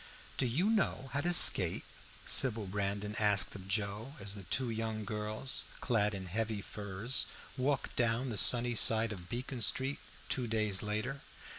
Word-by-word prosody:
"Do 130 - -1
you 170 - 0
know 135 - -1
how 140 - -1
to 175 +3 0
skate?" 175 - +7 0.4
Sybil 115 -5 +4
Brandon 100 +2 -4
asked 100 -3 +3
of 95 -1 -10
Joe 105 +6 -4
as 100 -1 -4
the 100 - -7
two 120 +7 -2
young 110 -1 -4
girls, 105 +5 -2
clad 105 -4 0
in 95 -1 -7
heavy 110 +3 -3
furs, 100 +4 -1 0.3
walked 135 +1 -2
down 120 +2 0
the 115 - -4
sunny 120 +3 +3
side 115 0 +3
of 90 -4 -9
Beacon 125 +1 -5
Street 135 +5 +1 0.3
two 125 -2 -1
days 110 -3 -1
later. 110 +7 -4
110 Hz, 160 wpm, -32 LUFS, 105-125 Hz, 0.4 s, skate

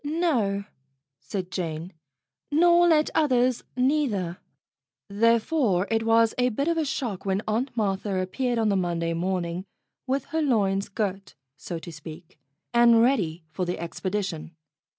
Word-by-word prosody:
"No," 285 - 0 0.6
said 185 -3 -5
Jane, 170 0 -4 0.6
"nor 345 +3 +5
let 310 -2 +3
others, 255 -4 +2
neither." 250 - 0 0.7
Therefore 225 - +2
it 225 0 +2
was 225 0 +3
a 250 0 +3
bit 275 +6 -2
of 335 - +2
a 315 - 0
shock 235 -8 -3
when 195 +1 -1
Aunt 230 +5 0
Martha 195 -2 0
appeared 240 +7 -1
on 220 -2 +2
the 200 - +2
Monday 170 -2 -1
morning 175 0 -2 0.4
with 270 +2 0
her 320 - +1
loins 200 -8 +1
girt, 200 -2 -3 0.2
so 165 +3 -6
to 170 +1 -9
speak, 160 +1 -11 0.3
and 235 -1 +6
ready 180 -11 +1
for 185 - -3
the 180 0 -2
expedition. 175 -1 -4
205 Hz, 140 wpm, -26 LUFS, 180-250 Hz, 0.7 s, and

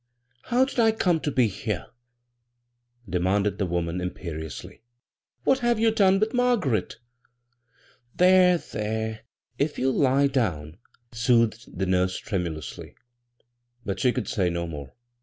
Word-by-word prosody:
How 250 +2 +3
did 265 - -5
1 225 -1 +4
come 180 -6 +1
to 150 - -2
be 130 -4 +3
here?" 100 -4 -4 1.2
denianded 95 +4 0
the 95 - 0
woman, 85 0 -2
imperiously. 85 +1 -6 0.6
"What 265 - +3
have 240 -2 +1
you 225 0 +3
done 195 -3 +4
with 215 +1 0
Margaret?" 230 - +1 1.2
"There, 180 0 +5
there; 110 -4 -4 0.4
if 145 +1 0
you'll 130 0 +1
lie 140 0 +3
down," 90 - -1 0.3
soothed 115 -1 +1
the 95 - 0
nurse 90 0 +1
tremulously; 85 - -5 0.9
but 100 -2 -3
she 125 - +3
could 120 -6 -3
say 95 -4 0
no 85 0 -2
more. 75 -5 -8
110 Hz, 130 wpm, -25 LUFS, -, 1.2 s, There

